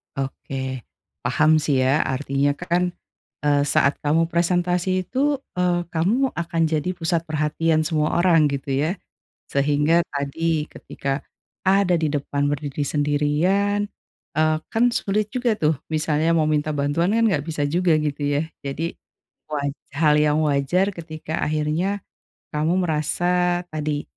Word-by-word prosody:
Oke 135 -1 -4 0.5
paham 155 +5 +4
sih 140 -4 +1
ya, 135 +4 +3
artinya 140 +1 0
kan, 175 +2 -1 0.5
eee, 145 -1 +4
saat 145 0 +3
kamu 160 +3 +2
presentasi 175 +2 +1
itu, 280 +2 +1 0.2
eee, 175 -1 +1
kamu 220 +12 +1
akan 170 0 -1
jadi 155 +2 -1
pusat 165 0 0
perhatian 155 +1 +1
semua 155 -1 +1
orang 165 -4 +4
gitu 140 0 -3
ya, 155 +8 0 0.5
sehingga 150 +4 +2
tadi, 150 +2 -1
ketika 135 +1 -4 0.4
ada 190 -2 +4
di 160 - 0
depan 145 0 -1
berdiri 145 0 -2
sendirian, 160 +9 +1 0.5
eee, 155 0 +3
kan 225 +2 +2
sulit 210 +1 0
juga 240 -4 +1
tuh 155 0 +2 0.2
misalnya 155 0 +1
mau 155 -2 +3
minta 155 0 +1
bantuan 145 +5 0
kan 230 - +3
nggak 160 -10 +1
bisa 145 -2 -1
juga 170 +1 +2
gitu 150 -1 -2 0.2
ya. 160 - -1 0.2
Jadi 140 +4 -3 0.6
waj 140 -2 -2 0.2
hal 150 -1 +4
yang 150 0 +2
wajar 150 +8 +1
ketika 160 -1 -5
akhirnya 155 +6 0 0.5
kamu 160 +5 +1
merasa 175 +2 +1
tadi, 150 -1 -2
155 Hz, 135 wpm, -23 LUFS, 145-175 Hz, 0.6 s, paham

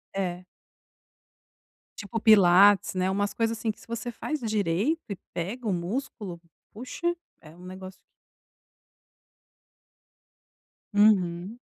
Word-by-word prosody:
é. 180 -2 -3 1.5
Tipo 205 +2 -4
pilates, 200 -2 +6
né, 185 0 0
umas 205 +1 -1
coisas 230 0 -1
assim, 220 0 -1
que - - -17
se - - -17
você 235 +1 -4
faz 310 +6 -4
direito 215 - 0
e - - -2 0.2
pega 215 +8 -4
o 200 - +1
músculo, 185 0 -4 0.3
puxa, 340 +10 -3 0.3
é 155 +1 -15
um 180 - -14
negócio 185 +1 -9 3.0
Uhum. 200 0 +2
205 Hz, 105 wpm, -27 LUFS, 185-230 Hz, 3.0 s, pilates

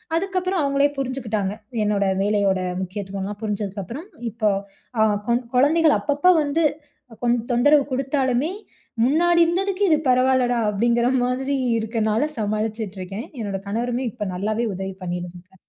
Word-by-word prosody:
அதுக்கப்பறம் 370 0 0
அவுங்களே 280 0 +3
புரிஞ்சுக்கிட்டாங்க. 230 -7 -2 0.3
என்னோட 205 -1 +1 0.2
வேலையோட 200 -2 +2 0.2
முக்கியத்துவம்லாம் 195 +1 -5
புரிஞ்சதுக்கப்பறம், 210 - -4 0.2
இப்ப 225 +2 -14 0.6
அ - - +7 0.3
கொ - - +4 0.2
குழந்தைகள 310 +4 +4
அப்பப்ப 295 +5 +3
வந்து 295 +3 0 0.6
கொஞ்சம் 240 0 +1
தொந்தரவு 285 +4 +5
குடுத்தாலுமே 265 +2 0 0.5
முன்னாடி 340 +6 +3
இருந்ததுக்கு 380 +3 0
இது 310 - +5
பரவால்லடா! 255 -1 +3
அப்பிடிங்கிற 235 +3 +2 0.2
மாதிரி 265 +2 -1 0.2
இருக்கனால 220 +4 0
சமாளிச்சிட்டு 215 -1 -2
இருக்கேன். 195 +5 -6
என்னோட 200 -2 -3
கணவருமே 240 +4 -1
இப்ப 210 - -5
நல்லாவே 215 +5 -1
உதவி 190 +1 -4
பண்ணிக்காரு 175 +1 -6
235 Hz, 120 wpm, -22 LUFS, 205-280 Hz, 0.6 s, அ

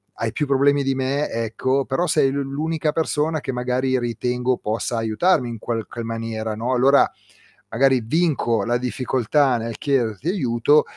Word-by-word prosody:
hai - - -2
più 150 - -2
problemi 140 +1 +3
di 135 -1 0
me, 135 +3 -1
ecco, 125 +4 -1
però 170 +7 0
sei 135 -3 +3
l'u 140 0 -1
l'unica 150 +3 -2
persona 155 0 0
che 135 - -3
magari 125 +1 0
ritengo 125 +1 -1
possa 115 +2 -2
aiutarmi 120 +5 +1
in 115 -2 -6
qualche 115 0 -4
maniera, 115 -1 -4
no, 120 +4 -2
allora 135 +3 +4 0.6
magari 130 +2 +3
vinco 120 - +1
la 120 +1 +1
difficoltà 130 +1 +1
nel 115 -1 -5
chiederti 130 - -1
aiuto, 145 - +3
130 Hz, 155 wpm, -22 LUFS, 115-140 Hz, 0.6 s, allora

